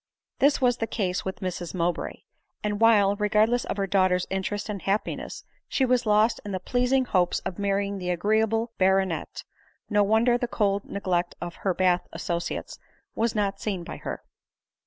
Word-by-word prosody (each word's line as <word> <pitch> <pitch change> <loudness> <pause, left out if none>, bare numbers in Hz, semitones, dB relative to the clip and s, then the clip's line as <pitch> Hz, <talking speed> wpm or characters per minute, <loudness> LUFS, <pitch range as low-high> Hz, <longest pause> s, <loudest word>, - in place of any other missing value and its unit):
This 280 +2 +4
was 245 -3 +3
the 225 - -2
case 185 -6 -1
with 190 +2 -5
Mrs 180 -1 -4
Mowbray; 175 0 -2 0.4
and 210 0 -2
while, 205 -3 +5
regardless 215 +3 +2
of - - -3
her 195 - 0
daughter's 185 -2 +2
interest 195 +2 -2
and 205 -3 -4
happiness, 200 +2 -2 0.3
she 265 - +2
was 250 -2 +1
lost 215 +2 +3
in 205 - -6
the 185 - -1
pleasing 250 +6 +1
hopes 180 -6 +2
of 180 - -5
marrying 200 0 0
the 180 -1 -3
agreeable 220 +5 +1
baronet, 190 -2 +1 0.5
no 210 0 +4
wonder 225 +4 +3
the 245 - -1
cold 200 -3 0
neglect 180 -3 -1
of 175 0 -5
her 190 -3 -1
Bath 180 -1 +2
associates 170 -1 -4 0.3
was 230 0 0
not 200 -1 -1
seen 195 -5 -2
by - - -7
her. - - -6
200 Hz, 170 wpm, -26 LUFS, 185-220 Hz, 0.5 s, while